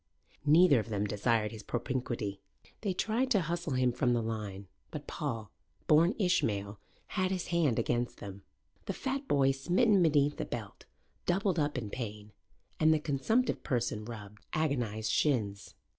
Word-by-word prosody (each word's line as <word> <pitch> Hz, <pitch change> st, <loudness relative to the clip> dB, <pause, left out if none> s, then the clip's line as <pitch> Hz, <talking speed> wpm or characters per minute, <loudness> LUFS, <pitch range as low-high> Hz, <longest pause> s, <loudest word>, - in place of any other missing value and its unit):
Neither 155 Hz, -3 st, +7 dB
of 110 Hz, -, -5 dB
them 105 Hz, -1 st, 0 dB
desired 105 Hz, +1 st, +1 dB
his 110 Hz, -2 st, -8 dB
propinquity. 120 Hz, -4 st, -3 dB, 0.4 s
They 205 Hz, -, 0 dB
tried 225 Hz, +7 st, 0 dB
to 210 Hz, -7 st, +4 dB
hustle 170 Hz, -2 st, -2 dB
him 130 Hz, -1 st, +3 dB
from 125 Hz, 0 st, +1 dB
the 120 Hz, -1 st, +1 dB
line. 105 Hz, -3 st, -4 dB, 0.2 s
But 150 Hz, -2 st, -7 dB
Paul, 115 Hz, -, -4 dB, 0.3 s
born 165 Hz, +6 st, +5 dB
Ishmael, 105 Hz, -, 0 dB, 0.3 s
had 185 Hz, -2 st, 0 dB
his 185 Hz, -2 st, -3 dB
hand 165 Hz, -9 st, +2 dB
against 120 Hz, 0 st, 0 dB
them. 100 Hz, 0 st, -8 dB, 0.5 s
The -, -, -1 dB
fat 270 Hz, +1 st, -3 dB
boy, 135 Hz, -1 st, +4 dB
smitten 180 Hz, -, +3 dB
beneath 150 Hz, -3 st, +3 dB
the -, -, -2 dB
belt, 110 Hz, -5 st, -7 dB, 0.4 s
doubled 180 Hz, -1 st, +1 dB
up 145 Hz, -2 st, 0 dB
in 110 Hz, -5 st, -4 dB
pain 105 Hz, -3 st, -6 dB, 0.5 s
and 155 Hz, 0 st, +5 dB
the 155 Hz, -, +5 dB
consumptive 155 Hz, -, +1 dB
person 120 Hz, -5 st, -1 dB
rubbed 105 Hz, -2 st, -9 dB
agonized 120 Hz, -8 st, 0 dB
shins. 105 Hz, -9 st, 0 dB
130 Hz, 155 wpm, -31 LUFS, 110-170 Hz, 0.5 s, Neither